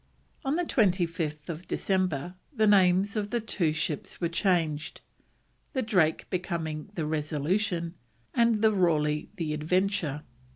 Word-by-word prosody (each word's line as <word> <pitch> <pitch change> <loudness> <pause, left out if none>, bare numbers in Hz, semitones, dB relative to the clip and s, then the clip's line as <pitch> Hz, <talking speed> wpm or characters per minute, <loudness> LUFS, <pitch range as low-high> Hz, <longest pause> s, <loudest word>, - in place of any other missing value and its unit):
On 275 +4 0
25th 170 - 0
December 180 -5 -1 0.2
the 220 -7 +2
names 195 0 +4
of 210 -1 -1
the 240 - 0
two 200 -7 0
ships 160 0 -3
were 170 - 0
changed, 165 -4 0 0.7
the 260 -3 0
Drake 180 -8 +2
becoming 170 -3 -3
the 160 - -1
Resolution, 165 +4 -1 0.4
and 230 -2 +3
the 220 -1 +5
Raleigh 150 -5 +1
the 155 -3 -2
Adventure. 160 -1 0
175 Hz, 120 wpm, -28 LUFS, 155-205 Hz, 0.7 s, the